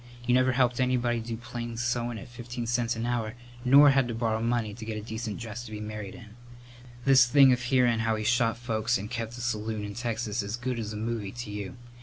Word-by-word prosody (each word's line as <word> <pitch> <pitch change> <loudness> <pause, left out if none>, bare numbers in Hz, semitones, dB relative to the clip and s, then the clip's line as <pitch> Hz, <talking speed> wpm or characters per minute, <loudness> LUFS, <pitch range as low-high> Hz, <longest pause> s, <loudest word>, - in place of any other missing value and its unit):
You 125 - +2
never 130 0 +4
helped 125 -1 +2
anybody 125 -2 +1
do 115 0 -5
plain 120 0 -6
sewin' 120 0 -1
at 100 - -9
fifteen 120 0 -6
cents 120 0 0
a 115 +1 -3
hour 120 -2 -1 0.3
nor 140 +3 +8
had 135 -2 +3
to 120 - -3
borrow 110 -1 0
money 115 -2 0
to 110 +1 -9
get 110 -1 -4
a - - -4
decent 110 -1 -4
dress 115 0 -6
to 110 - -10
be 105 - -5
married 105 -2 -6
in. 115 -4 -12 0.8
This 130 -2 +7
thing 135 0 +7
of 125 - -1
hearin' 125 -2 +3
how 110 0 +1
he 110 - -3
shot 115 0 +2
folks 115 0 0
and 105 +3 -7
kept 115 0 -4
a - - -6
saloon 110 -2 -2
in 100 - -6
Texas 115 -1 -2
is 100 +3 -4
good 125 0 -3
as 110 -2 -4
a 105 - -5
movie 110 -2 -3
to 120 -2 -7
you. 105 +5 -5
115 Hz, 235 wpm, -28 LUFS, 110-125 Hz, 0.8 s, nor